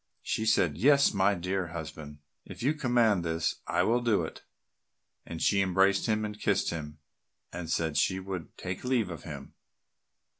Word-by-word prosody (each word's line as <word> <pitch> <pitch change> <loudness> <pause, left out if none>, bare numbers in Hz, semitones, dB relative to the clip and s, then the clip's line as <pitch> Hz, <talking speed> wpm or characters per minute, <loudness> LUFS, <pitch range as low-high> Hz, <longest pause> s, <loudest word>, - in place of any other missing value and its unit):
She 110 - -1
said, 85 -8 +2
"Yes, 140 +4 +5
my 100 0 +3
dear 90 +1 -2
husband, 80 -3 -8 0.3
if - - -9
you 145 +4 +3
command 120 - +2
this, 80 0 -1
I 85 +1 +2
will 120 +5 +2
do 110 -7 +2
it," 80 - -7 0.9
and 85 - -6
she 100 +3 +3
embraced 95 +1 +2
him 110 -1 +1
and 105 0 -6
kissed 100 -2 +1
him, 75 -2 -6 0.6
and 85 -2 -6
said 80 -2 0
she 95 +5 +2
would 95 -4 -7
take 90 0 -5
leave 125 -7 0
of 80 -4 -8
him. - - -8
95 Hz, 165 wpm, -29 LUFS, 85-110 Hz, 0.9 s, Yes